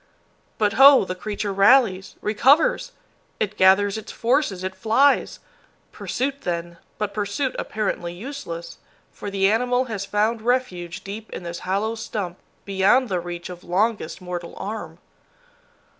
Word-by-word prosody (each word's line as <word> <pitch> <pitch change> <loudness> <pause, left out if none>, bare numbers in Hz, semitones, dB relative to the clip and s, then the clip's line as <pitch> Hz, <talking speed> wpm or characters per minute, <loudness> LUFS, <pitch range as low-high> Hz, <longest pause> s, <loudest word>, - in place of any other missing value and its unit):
But 210 -1 +1
ho! 275 -5 +9
the 185 - -3
creature 205 +1 -4
rallies 195 -2 +4
recovers! 290 - +3 0.5
It 210 -1 -1
gathers 195 +2 +4
its 220 - -10
forces, 235 -6 0
it 190 0 -3
flies! 245 +8 +2 0.5
Pursuit 275 +2 -3
then, 170 -1 -4 0.2
but 210 -1 -3
pursuit 210 +6 -2
apparently 200 -5 -3
useless, 175 -5 -7 0.3
for 205 - -7
the 195 -1 +2
animal 250 +3 +1
has 200 -2 -3
found 215 +3 0
refuge 215 -8 -2
deep 210 +3 -8
in - - -7
this 170 0 -6
hollow 205 +4 0
stump, 205 -5 -5 0.3
beyond 200 +6 +3
the 185 -2 0
reach 175 0 -6
of 180 -1 -10
longest 200 0 -1
mortal 175 -1 -6
arm! 195 -6 -6
205 Hz, 135 wpm, -23 LUFS, 185-230 Hz, 0.5 s, ho